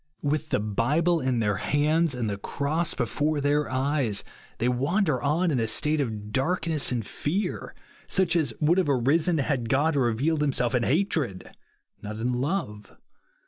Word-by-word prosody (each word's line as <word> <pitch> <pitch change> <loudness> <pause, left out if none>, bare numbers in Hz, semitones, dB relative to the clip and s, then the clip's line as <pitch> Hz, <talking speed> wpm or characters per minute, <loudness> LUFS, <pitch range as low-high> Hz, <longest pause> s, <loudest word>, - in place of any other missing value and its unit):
" - - -25
With 155 0 -3
the - - +1
Bible 145 - +1
in 130 -3 0
their 105 -2 0
hands, 150 - +1
and 120 -3 -2
the 100 -1 -3
cross 150 +9 -1
before 145 +5 0
their 145 +1 +1
eyes, 130 -5 0 0.3
they 120 - 0
wander 140 - +1
on 160 +5 +1
in 130 - +1
a 115 - 0
state 150 +6 +1
of 105 -5 -4
darkness 160 +3 0
and 120 -4 -2
fear, 185 - -3 0.3
such 190 -3 +2
as 155 -7 +1
would 165 +4 +3
have 180 - +1
arisen 150 +6 +2
had 135 -5 -1
God 145 +5 +2
revealed 135 +5 +1
himself 135 -4 +1
in 125 - +2
hatred, 140 - 0 0.5
not 105 +1 -6
in 120 +3 -1
love. 125 - -3
140 Hz, 165 wpm, -26 LUFS, 120-160 Hz, 0.5 s, would